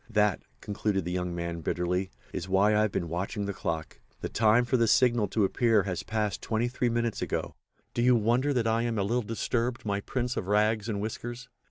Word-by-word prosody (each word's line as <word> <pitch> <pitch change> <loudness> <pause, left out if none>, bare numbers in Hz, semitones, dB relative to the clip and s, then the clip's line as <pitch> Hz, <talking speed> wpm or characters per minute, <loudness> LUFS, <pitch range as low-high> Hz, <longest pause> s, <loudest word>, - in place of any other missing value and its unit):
That," 105 -4 +2 0.2
concluded 100 -3 -1
the 90 - -3
young 90 -1 -2
man 85 -1 -4
bitterly, 90 +3 -1 0.2
"is 90 - -4
why 100 +3 +4
I 105 - +4
have 110 -1 +1
been 85 - -2
watching 95 +5 -3
that 100 - -3
clock. 80 -2 -4 0.2
The - - -3
time 115 +2 +4
for 130 - +1
the 115 -2 +3
signal 120 -2 +4
to 105 +3 +1
appear 110 0 +3
has 95 -3 -3
passed 105 -2 -2
twenty 115 +2 0
three 125 0 0
minutes 115 -1 -1
ago. - - -2 0.4
Do 120 - 0
you 125 +1 +5
wonder 120 +6 +2
that 125 -4 +1
I 115 +1 +2
am 115 -1 -1
a 100 - +1
little 120 +5 +1
disturbed, 115 +2 -2
my 100 -1 0
Prince 125 +2 -2
of 90 - -3
Rags 105 +1 +2
and 100 -2 -2
Whiskers?" 120 +3 -5
110 Hz, 215 wpm, -28 LUFS, 95-120 Hz, 0.4 s, you